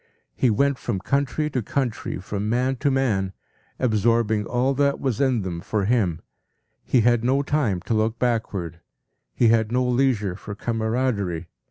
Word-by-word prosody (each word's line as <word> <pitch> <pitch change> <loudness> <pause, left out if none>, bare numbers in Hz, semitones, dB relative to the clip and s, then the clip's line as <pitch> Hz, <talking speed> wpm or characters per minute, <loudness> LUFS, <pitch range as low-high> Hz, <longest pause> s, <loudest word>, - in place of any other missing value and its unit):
He 130 - +2
went 140 +5 +2
from 115 -5 -2
country 140 +8 0
to 130 - -1
country, 120 0 -2
from 100 +3 -4
man 125 +3 +1
to 140 +3 +1
man, 110 -9 0 0.4
absorbing 110 -2 +1
all 125 +2 +1
that 140 +1 +1
was 130 -4 -1
in 130 -6 +2
them 90 -2 -4
for 100 +1 -1
him. 100 -8 +1 0.6
He 125 - +3
had 120 0 +3
no 135 +3 +2
time 130 -12 0
to 115 - -2
look 110 +1 +1
backward. 100 -9 -2 0.6
He 120 - +4
had 110 -1 +2
no 125 +1 +1
leisure 120 -7 +1
for 105 +2 -8
camaraderie. 110 -6 -1
115 Hz, 160 wpm, -24 LUFS, 105-130 Hz, 0.6 s, He